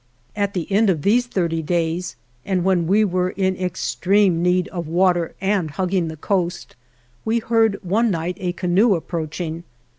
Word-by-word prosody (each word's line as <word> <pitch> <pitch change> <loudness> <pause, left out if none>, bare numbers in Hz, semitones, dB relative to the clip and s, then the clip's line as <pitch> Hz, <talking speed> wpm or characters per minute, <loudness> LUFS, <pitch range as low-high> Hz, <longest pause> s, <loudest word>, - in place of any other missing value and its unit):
At 200 -1 -1
the 175 -3 -1
end 210 +2 +3
of 160 -6 0
these 240 +4 +3
thirty 170 -7 -1
days, 170 +2 -1 0.3
and 185 -3 -1
when 180 -3 +2
we 210 +4 +4
were 180 -1 0
in 190 0 -1
extreme 185 0 +1
need 180 0 +2
of 175 -4 -5
water 175 0 +1
and 195 -4 0
hug 180 +4 -3
ging 180 -4 +1
the 160 0 -7
coast, 175 +1 -2 0.5
we 225 +1 +1
heard 225 -2 +2
one 215 +6 +1
night 175 -1 -2
a 180 -1 -2
canoe 185 +4 +2
approaching. 165 0 -4
180 Hz, 170 wpm, -21 LUFS, 170-200 Hz, 0.5 s, we